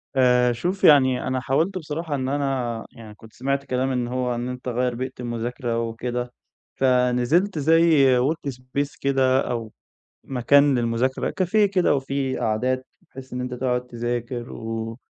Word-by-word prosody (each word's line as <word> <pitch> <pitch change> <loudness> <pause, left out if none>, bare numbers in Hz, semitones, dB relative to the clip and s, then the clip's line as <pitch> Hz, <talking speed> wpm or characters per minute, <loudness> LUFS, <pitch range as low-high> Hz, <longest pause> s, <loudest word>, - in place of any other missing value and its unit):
آآ 125 -1 +4
شوف 180 +11 -3
يعني 130 -4 +5
أنا 130 0 0
حاولت 155 +9 0
بصراحة 160 -2 -4
إن 130 -1 -2
أنا 135 -5 -2
يعني 110 -2 -12
كنت 110 +1 -16
سمعت 140 +2 -2
كلام 130 +1 -1
إن 125 -2 -1
هو 125 0 -1
إن 120 +1 -3
أنت 125 0 -7
غيّر 125 0 0
بيئة 130 +2 -4
المذاكرة 120 0 -3
وكده، 120 +2 -3 0.4
فنزلت 130 +8 +2
زي 155 -4 +5
workspace 140 -1 -2
كده 135 -1 +2
أو 115 -2 -4 0.5
مكان 140 +2 +3
للمذاكرة، 120 +3 -1
cafe 185 +4 -1
كده 185 -5 +2
وفيه 135 -1 -2
قعدات، 130 +4 0 0.2
بحيث 130 0 -11
إن 125 - -3
أنت 125 0 -4
تقعد 125 0 -1
تذاكر 120 0 -4
و 115 +1 -5
130 Hz, 145 wpm, -23 LUFS, 120-140 Hz, 0.5 s, يعني